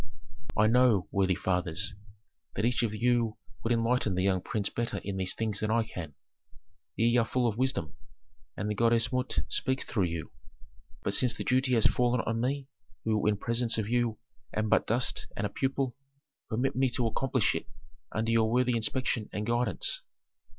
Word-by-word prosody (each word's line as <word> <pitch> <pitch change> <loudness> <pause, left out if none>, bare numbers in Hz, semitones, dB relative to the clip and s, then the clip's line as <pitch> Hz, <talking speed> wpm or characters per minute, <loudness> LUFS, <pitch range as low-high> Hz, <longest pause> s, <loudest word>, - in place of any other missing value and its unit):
I 110 - +5
know, 115 -4 +4
worthy 95 -2 +2
fathers, 90 +2 -1 0.6
that 100 - 0
each 120 0 +2
of 115 -3 0
you 115 0 +1 0.2
would 115 - -1
enlighten 115 -3 +2
the 95 - +1
young 95 -2 +2
prince 100 +1 -2
better 120 0 -2
in 100 -1 -3
these 95 -1 0
things 110 -3 -2
than 110 - -1
I 115 +1 +3
can; 80 -9 -7 0.8
ye 115 +2 +3
are 120 - +5
full 125 -1 +1
of 110 - -1
wisdom, 130 - 0 0.6
and 100 - -2
the 105 - 0
goddess 115 +2 +2
Mut 125 - 0
speaks 130 +8 0
through 100 -6 0
you. 85 -2 -4 0.7
But - - -1
since 125 -3 +2
the - - -4
duty 130 0 +2
has 115 - +3
fallen 125 -1 +3
on 115 0 -2
me, 135 +2 -1 0.4
who 110 -2 +1
in 105 -1 +2
presence 115 +2 0
of 110 -2 -1
you 120 -2 +1 0.4
am 110 0 0
but - - +3
dust 120 +3 0
and 100 - -1
a 100 - -2
pupil, 135 0 -1 0.5
permit 125 +5 0
me 130 0 +3
to 120 - +1
accomplish 115 +3 +1
it - - -4 0.4
under 110 +2 0
your 115 -1 +3
worthy 125 0 +2
inspection 115 -1 -1
and 105 - -3
guidance." 120 -4 +1
115 Hz, 180 wpm, -30 LUFS, 105-125 Hz, 0.8 s, I